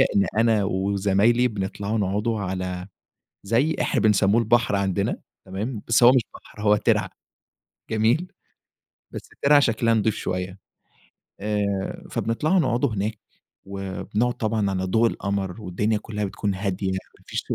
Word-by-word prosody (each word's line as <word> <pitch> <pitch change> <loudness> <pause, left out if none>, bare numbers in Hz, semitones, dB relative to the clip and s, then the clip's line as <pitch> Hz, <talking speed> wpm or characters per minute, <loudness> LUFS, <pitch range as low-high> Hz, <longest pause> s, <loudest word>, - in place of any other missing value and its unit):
إن 100 - +4
أنا 115 -2 +3
وزمايلي 100 +5 +2
بنطلع 100 -1 -3
نقعد 105 +2 -1
على 95 -4 -3 0.6
زي 120 +10 +1
إحنا - - +1
بنسميه 105 0 +3
البحر 115 -2 +2
عندنا 100 0 0 0.3
تمام؟ 105 +4 -4
بس 115 +1 +4
هو 120 +2 +9
مش 130 - +4
بحر 105 - -12
هو 105 0 +4
ترعة - - +1 0.8
جميل؟ 115 +11 +1 0.8
بس - - -8
ترعة 145 0 +6
شكلها 115 -3 +2
نضيف 110 -1 +1
شويّة. 90 +1 -4 0.8
آآ، 100 -1 -2
فبنطلع 150 +11 0
نقعد 130 -5 +2
هناك 110 -3 -2 0.5
وبنقعد 100 +5 -2
طبعًا 110 -3 -1
على 95 0 -2
ضوء 110 +5 +3
القمر، 100 -2 -3
والدنيا 105 +4 0
كلّها 105 0 -4
بتكون 100 +1 -2
هادية 95 0 -2
ما 95 0 -7
فيش - - -3
105 Hz, 135 wpm, -24 LUFS, 95-115 Hz, 0.8 s, هو